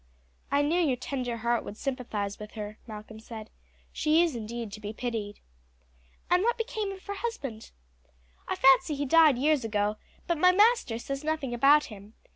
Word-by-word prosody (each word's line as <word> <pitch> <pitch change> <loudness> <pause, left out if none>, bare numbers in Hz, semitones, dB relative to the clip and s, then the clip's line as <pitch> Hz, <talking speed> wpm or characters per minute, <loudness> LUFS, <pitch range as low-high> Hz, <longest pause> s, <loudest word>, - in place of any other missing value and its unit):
"I 285 +1 +2
knew 325 +5 +1
your 285 -7 +2
tender 245 -2 -4
heart 235 +1 0
would 210 - -8
sympathize 225 -7 -3
with 210 0 -9
her," 210 -1 -7
Malcolm 215 0 -9
said; 220 -1 -10 0.4
"she 315 +2 +3
is 330 -6 -1
indeed 230 -1 -5
to 215 - -8
be 210 0 -6
pitied." 220 -3 -4 0.9
"And 355 +1 +3
what 475 +3 +1
became 435 -3 -3
of 385 -1 -10
her 405 - -4
husband?" 340 - -5 0.8
"I - - -1
fancy 270 +3 +5
he 285 +1 -2
died 310 -2 +6
years 290 0 +2
ago; 210 -1 0 0.3
but 340 -3 -1
my 365 +2 +6
master 420 - +3
says 275 +4 -5
nothing 310 -5 -2
about 280 +5 +5
him. 205 +2 -13
255 Hz, 175 wpm, -28 LUFS, 220-315 Hz, 0.9 s, died